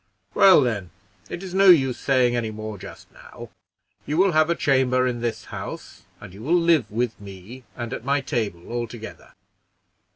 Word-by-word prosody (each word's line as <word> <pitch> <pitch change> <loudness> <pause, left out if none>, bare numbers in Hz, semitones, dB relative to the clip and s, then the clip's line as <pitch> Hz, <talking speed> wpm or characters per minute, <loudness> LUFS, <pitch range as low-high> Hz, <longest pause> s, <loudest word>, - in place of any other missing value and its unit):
"Well, 190 -6 +7
then, 105 -8 -2 0.4
it 175 - -6
is 185 -2 -8
no 195 0 +5
use 135 -8 +4
saying 125 -3 +2
any 115 -2 -2
more 110 -1 -7
just - - -12
now; - - -13 0.6
you 150 +3 -2
will 190 +1 +4
have 155 0 +3
a 170 - +2
chamber 130 -3 +2
in 120 -2 -2
this 120 -1 -3
house, - - -8
and 100 -3 -12
you 100 - -12
will 160 +9 +2
live 165 -6 +2
with 115 0 -3
me, 100 +6 -11
and 120 0 -6
at - - -6
my 140 +2 +1
table 110 - -4
altogether. 120 -1 -7
125 Hz, 175 wpm, -23 LUFS, 110-150 Hz, 0.6 s, Well